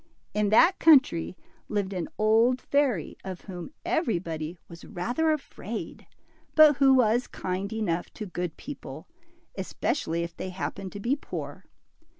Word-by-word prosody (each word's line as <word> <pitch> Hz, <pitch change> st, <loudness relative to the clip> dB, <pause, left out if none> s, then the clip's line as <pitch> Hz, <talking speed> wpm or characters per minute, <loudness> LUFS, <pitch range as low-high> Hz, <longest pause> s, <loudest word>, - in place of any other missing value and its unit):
In 210 Hz, -1 st, +1 dB
that 335 Hz, -, +5 dB
country 270 Hz, -, +5 dB, 0.3 s
lived 200 Hz, -2 st, -1 dB
an 180 Hz, -3 st, -3 dB
old 225 Hz, +4 st, +4 dB
fairy, 270 Hz, -, 0 dB
of 185 Hz, -2 st, -6 dB
whom 180 Hz, -3 st, -8 dB, 0.2 s
every 325 Hz, -, +1 dB
body 165 Hz, -1 st, -5 dB
was 170 Hz, 0 st, -12 dB
rather 245 Hz, -, -1 dB
afraid, 305 Hz, -2 st, -5 dB, 0.5 s
but 305 Hz, -3 st, +8 dB
who 270 Hz, -1 st, +6 dB
was 240 Hz, 0 st, +3 dB
kind 190 Hz, +2 st, -4 dB
enough 190 Hz, -6 st, -2 dB
to 215 Hz, -, -5 dB
good 175 Hz, -3 st, -4 dB
people, 160 Hz, -, -8 dB, 0.5 s
especially 170 Hz, -, -2 dB
if 170 Hz, 0 st, -6 dB
they 185 Hz, -, -5 dB
happened 190 Hz, +1 st, -5 dB
to 205 Hz, -, -6 dB
be 240 Hz, +7 st, +1 dB
poor. 290 Hz, -, -7 dB
205 Hz, 145 wpm, -27 LUFS, 175-265 Hz, 0.5 s, but